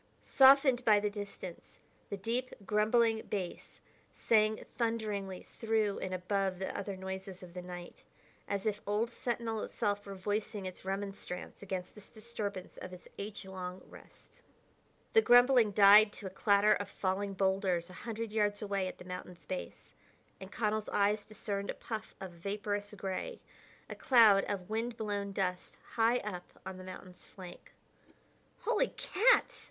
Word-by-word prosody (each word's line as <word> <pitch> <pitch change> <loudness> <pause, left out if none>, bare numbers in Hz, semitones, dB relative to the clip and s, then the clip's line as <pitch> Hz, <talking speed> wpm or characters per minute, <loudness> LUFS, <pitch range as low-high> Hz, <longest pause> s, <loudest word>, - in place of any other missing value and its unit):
Softened 265 -2 +6
by 215 -3 +6
the 205 0 -1
distance, 200 -4 -8 0.3
the 200 - -3
deep, 240 +6 -2
grumbling 220 +2 +3
bass 185 -4 -5 0.3
sang 215 -1 +2
thunderingly 210 -5 -2
through 220 -3 -1
and 185 - -4
above 185 +1 -1
the 190 - -4
other 200 -1 -4
noises 190 0 -6
of 175 -1 -11
the 180 - -5
night, 175 -1 -9 0.4
as 200 0 -2
if 210 -1 -1
old 215 +3 0
Sentinel 230 -2 -2
itself 205 -2 -1
were 200 -1 -8
voicing 205 +1 -3
its 185 -1 -7
remonstrance 195 -1 -5
against 185 -2 -5
this 210 -1 -14
disturbance 215 -4 -6
of 185 - -8
its 180 - -12
age 200 0 -6
long 185 -1 -6
rest. - - -17 0.7
The 445 - +7
grumbling 245 - +6
died 205 +1 +8
to 205 - -9
a 190 - -4
clatter 205 +2 +4
of 205 -1 -3
falling 195 +1 -2
boulders 190 -3 +1
a 180 - -10
hundred 230 -1 -4
yards 210 -1 +1
away 200 -2 -1
at - - -7
the - - -12
mountain's 180 -1 -8
base, 185 -1 -6 0.5
and 190 +1 -9
Connell's 215 -1 -1
eyes 205 +1 +2
discerned 200 -2 -4
a - - -2
puff 220 -1 -6
of 190 -2 -6
vaporous 205 +3 -3
gray, 195 - -4 0.5
a - - -6
cloud 220 -6 +6
of 190 -3 -3
wind 225 +2 -2
blown 205 -3 -2
dust, 180 -2 -3 0.2
high 230 +1 +3
up 180 -4 -7
on 190 -1 -6
the 185 - -9
mountain's 185 -1 -10
flank. 185 -2 -12 0.9
"Holy - - +2
cats!" 470 +6 +3
205 Hz, 155 wpm, -33 LUFS, 190-220 Hz, 0.9 s, died